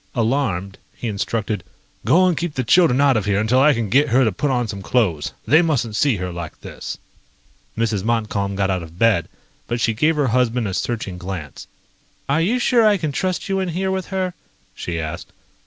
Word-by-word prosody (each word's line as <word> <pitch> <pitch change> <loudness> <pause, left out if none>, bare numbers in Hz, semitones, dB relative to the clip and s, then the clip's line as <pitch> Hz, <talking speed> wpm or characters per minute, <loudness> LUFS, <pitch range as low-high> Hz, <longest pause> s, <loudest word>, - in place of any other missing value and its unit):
Alarmed, 110 -6 -1 0.2
he 120 - -5
instructed: 105 -1 -2 0.4
"Go 185 +4 +5
and 180 -2 +2
keep 170 -1 -3
the 130 - 0
children 150 0 +4
out 140 -2 +4
of 105 -3 0
here 100 -1 +1
until 110 +4 +2
I 150 0 +5
can 115 -2 -1
get 140 +8 +3
her 130 +3 +4
to 110 - +2
put 140 +10 -1
on 125 -3 0
some 100 -2 -6
clothes. 95 -10 0
They 155 +4 +5
mustn't 125 -10 0
see 140 0 +2
her 90 -2 -4
like 85 -2 -7
this." - - -7 0.8
Mrs. 110 -4 0
Montcalm 105 -3 -1
got 95 0 0
out 90 -1 -1
of 85 0 -11
bed, 105 -6 +2 0.4
but 120 0 -2
she 115 0 +1
gave 155 +9 +2
her 145 -4 +1
husband 125 -1 +1
a 95 - -3
searching 100 -4 -3
glance. 90 -5 -7 0.6
"Are 145 +4 +2
you 215 +9 +2
sure 245 -1 +3
I 210 -2 +5
can 155 -5 -2
trust 185 +5 -2
you 195 -1 0
in 190 -1 -1
here 190 +3 -1
with 190 -1 -2
her?" 185 -2 -2 0.4
she 85 -1 -4
asked. 80 +2 -6
115 Hz, 205 wpm, -21 LUFS, 100-150 Hz, 0.8 s, Go